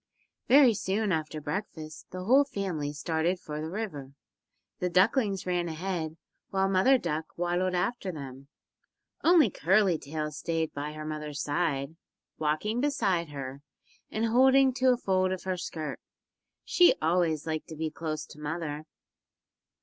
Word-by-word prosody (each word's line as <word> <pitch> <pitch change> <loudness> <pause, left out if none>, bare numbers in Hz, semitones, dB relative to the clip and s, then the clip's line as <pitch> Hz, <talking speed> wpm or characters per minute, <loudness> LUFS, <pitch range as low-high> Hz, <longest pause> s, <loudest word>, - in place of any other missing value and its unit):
Very 265 -3 +7
soon 200 +1 -1
after 155 -2 -2
breakfast 155 0 -6
the 185 0 -6
whole 260 +8 +6
family 185 - -3
started 160 +4 -1
for 150 -3 -6
the 160 - -4
river. 160 -9 -5 0.7
The 180 - 0
ducklings 195 +2 +2
ran 175 -1 0
ahead, 165 -1 -3 0.3
while 195 0 +1
Mother 195 +8 +4
Duck 160 -7 -2
waddled 175 +1 0
after 195 +1 -1
them. 135 -3 -9 0.8
Only 320 - +6
Curly 185 -1 +3
Tail 150 +1 -4
stayed 160 +1 -2
by 145 +1 -4
her 155 0 -7
mother's 150 -2 -4
side, 145 -1 -1 0.4
walking 160 +10 0
beside 195 - +1
her, 135 -1 -6 0.5
and 220 +1 -1
holding 260 +3 +5
to 260 0 +3
a 250 - +2
fold 185 -4 +1
of 185 - -4
her 185 -1 -1
skirt. 155 -4 -5 0.7
She 355 -1 +5
always 160 -1 +1
liked 155 -1 -3
to 160 - -8
be 160 0 -3
close 155 -1 -4
to 150 - -14
mother. 150 0 -4
170 Hz, 145 wpm, -29 LUFS, 155-195 Hz, 0.8 s, Very